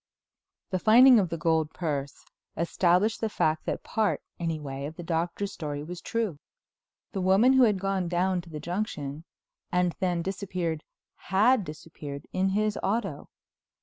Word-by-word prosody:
IX -, -, -58 dB
The 185 Hz, -, 0 dB
finding 245 Hz, +2 st, +8 dB
of 185 Hz, -4 st, 0 dB
the 165 Hz, -, -3 dB
gold 160 Hz, -1 st, +1 dB
purse 145 Hz, -5 st, -3 dB, 0.3 s
established 180 Hz, +6 st, +2 dB
the 220 Hz, -, 0 dB
fact 155 Hz, -6 st, 0 dB
that -, -, -2 dB
part, 220 Hz, -2 st, 0 dB, 0.2 s
anyway, 150 Hz, -5 st, -3 dB
of 155 Hz, -, -9 dB
the 175 Hz, -, -7 dB
Doctor's 170 Hz, +4 st, -2 dB
story 145 Hz, -2 st, -5 dB
was 175 Hz, +2 st, -7 dB
true—the 200 Hz, 0 st, -6 dB
woman 195 Hz, +8 st, +5 dB
who 265 Hz, -, +5 dB
had 210 Hz, -4 st, +2 dB
gone 195 Hz, -2 st, -1 dB
down 180 Hz, +1 st, +1 dB
to 170 Hz, -, -15 dB
the 155 Hz, -2 st, -6 dB
junction 160 Hz, -4 st, -4 dB, 0.5 s
and 180 Hz, -1 st, +1 dB
then 175 Hz, -2 st, 0 dB
disappeared 180 Hz, -4 st, -3 dB, 0.5 s
had 215 Hz, +5 st, +4 dB
disappeared 150 Hz, -3 st, -8 dB
in 190 Hz, +1 st, +2 dB
his 210 Hz, +2 st, 0 dB
auto. 195 Hz, -7 st, -2 dB
180 Hz, 150 wpm, -28 LUFS, 160-200 Hz, 0.5 s, finding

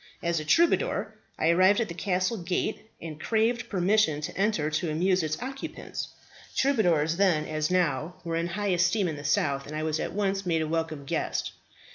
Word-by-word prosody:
As 170 Hz, -1 st, +1 dB
a 155 Hz, -, -6 dB
troubadour 335 Hz, -, +2 dB, 0.2 s
I 160 Hz, -, +2 dB
arrived 185 Hz, +5 st, +5 dB
at 230 Hz, -, 0 dB
the 170 Hz, -, -6 dB
castle 185 Hz, +5 st, 0 dB
gate, 185 Hz, +5 st, -2 dB
and 160 Hz, -2 st, -8 dB
craved 230 Hz, +2 st, +1 dB
permission 190 Hz, -4 st, +2 dB
to 150 Hz, -, -5 dB
enter 195 Hz, -7 st, +1 dB
to 160 Hz, +2 st, -1 dB
amuse 180 Hz, +4 st, +2 dB
its 155 Hz, -1 st, -2 dB
occupants. 270 Hz, +2 st, -6 dB, 0.5 s
Troubadours 175 Hz, -, +2 dB
then, 180 Hz, -6 st, +3 dB
as 155 Hz, 0 st, -1 dB
now, 175 Hz, -2 st, 0 dB
were 165 Hz, -1 st, -3 dB
in 165 Hz, +1 st, 0 dB
high 205 Hz, +4 st, -2 dB
esteem 180 Hz, +2 st, +2 dB
in 160 Hz, -, -3 dB
the 145 Hz, -, -8 dB
south, 140 Hz, -1 st, 0 dB
and 150 Hz, -, -6 dB
I 155 Hz, -, -2 dB
was 155 Hz, 0 st, -1 dB
at -, -, -3 dB
once 195 Hz, -1 st, 0 dB
made 165 Hz, -3 st, +1 dB
a -, -, -3 dB
welcome 160 Hz, -3 st, -2 dB
guest. -, -, -2 dB
175 Hz, 190 wpm, -27 LUFS, 155-200 Hz, 0.5 s, arrived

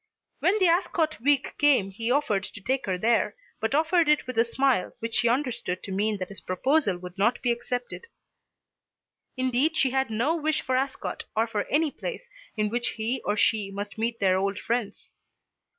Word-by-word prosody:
When 390 Hz, +4 st, +3 dB
the 380 Hz, -, +3 dB
Ascot 335 Hz, -, +1 dB
week 285 Hz, +1 st, +1 dB
came 260 Hz, -10 st, +4 dB
he 225 Hz, +4 st, -4 dB
offered 245 Hz, -7 st, +2 dB
to -, -, -9 dB
take 260 Hz, +5 st, -1 dB
her 185 Hz, -1 st, 0 dB
there, 230 Hz, +5 st, +1 dB, 0.2 s
but 225 Hz, +5 st, 0 dB
offered 325 Hz, +1 st, +3 dB
it 300 Hz, 0 st, +3 dB
with 255 Hz, -1 st, -5 dB
a -, -, +7 dB
smile 245 Hz, -3 st, +1 dB
which 230 Hz, 0 st, -5 dB
she 235 Hz, -, +3 dB
understood 240 Hz, -8 st, -1 dB
to 195 Hz, -, -6 dB
mean 205 Hz, +2 st, 0 dB
that 185 Hz, -2 st, -5 dB
his 200 Hz, -, -8 dB
proposal 230 Hz, -, +1 dB
should 180 Hz, +1 st, -10 dB
not 230 Hz, +5 st, +2 dB
be 245 Hz, -, +2 dB
accepted. 245 Hz, -, -4 dB, 1.3 s
Indeed 260 Hz, +5 st, +1 dB
she 265 Hz, -, +2 dB
had 265 Hz, -1 st, 0 dB
no 235 Hz, +9 st, +1 dB
wish 315 Hz, -1 st, 0 dB
for 260 Hz, -, 0 dB
Ascot 265 Hz, +1 st, -2 dB
or 220 Hz, +1 st, +3 dB
for 215 Hz, -3 st, -2 dB
any 305 Hz, 0 st, +1 dB
place -, -, -6 dB, 0.3 s
in 210 Hz, -1 st, +1 dB
which 240 Hz, +2 st, -1 dB
he 230 Hz, +3 st, -2 dB
or 205 Hz, +1 st, 0 dB
she 210 Hz, -2 st, +2 dB
must 200 Hz, +2 st, -6 dB
meet 230 Hz, +1 st, -1 dB
their 190 Hz, -1 st, +3 dB
old 195 Hz, 0 st, -1 dB
friends. 230 Hz, -1 st, -3 dB
240 Hz, 190 wpm, -26 LUFS, 205-280 Hz, 1.3 s, a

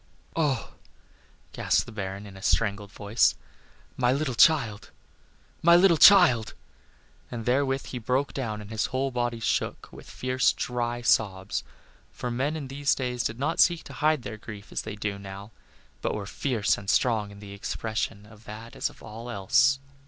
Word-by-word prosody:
"Oh!" 150 Hz, -5 st, 0 dB, 0.8 s
gasped -, -, +1 dB
the -, -, -10 dB
Baron, 100 Hz, -1 st, -5 dB
in 100 Hz, -2 st, -11 dB
a 95 Hz, -, -11 dB
strangled 100 Hz, -1 st, 0 dB
voice, 105 Hz, +3 st, +2 dB, 0.6 s
"my 125 Hz, -1 st, +3 dB
little 140 Hz, 0 st, 0 dB
child! 115 Hz, -6 st, +3 dB, 0.7 s
my 170 Hz, +1 st, +7 dB
little 175 Hz, 0 st, +6 dB
child!" 160 Hz, -, +7 dB, 0.7 s
And 115 Hz, -2 st, -6 dB
therewith 135 Hz, +1 st, +1 dB
he 125 Hz, -, -5 dB
broke 130 Hz, +5 st, -1 dB
down, 110 Hz, -6 st, -3 dB
and 105 Hz, +1 st, -11 dB
his 110 Hz, -1 st, 0 dB
whole 135 Hz, +1 st, -1 dB
body 120 Hz, -1 st, -2 dB
shook 110 Hz, -, -2 dB
with -, -, -12 dB
fierce, 130 Hz, 0 st, +1 dB
dry 120 Hz, 0 st, -3 dB
sobs; 95 Hz, -4 st, +1 dB, 0.5 s
for 125 Hz, -, -5 dB
men 135 Hz, +6 st, -1 dB
in 150 Hz, -4 st, -5 dB
those 140 Hz, +1 st, 0 dB
days 125 Hz, -2 st, -2 dB
did 110 Hz, -, -2 dB
not 150 Hz, +6 st, -1 dB
seek 170 Hz, -2 st, +4 dB
to -, -, -11 dB
hide 155 Hz, -3 st, +1 dB
their 110 Hz, -, -6 dB
grief 105 Hz, -1 st, -10 dB
as -, -, -2 dB
they 110 Hz, -1 st, -6 dB
do 105 Hz, -1 st, -3 dB
now, 100 Hz, +2 st, -9 dB, 0.5 s
but -, -, -1 dB
were 105 Hz, -2 st, -4 dB
fierce 115 Hz, 0 st, 0 dB
and 100 Hz, -1 st, -7 dB
strong 110 Hz, -1 st, +2 dB
in 100 Hz, -, -12 dB
the 100 Hz, -1 st, -10 dB
expression 110 Hz, +1 st, -4 dB
of 105 Hz, +1 st, -17 dB
that 110 Hz, +2 st, -9 dB
as -, -, -1 dB
of -, -, -17 dB
all 115 Hz, +3 st, -8 dB
else. 130 Hz, +6 st, +3 dB
115 Hz, 175 wpm, -27 LUFS, 105-135 Hz, 0.8 s, my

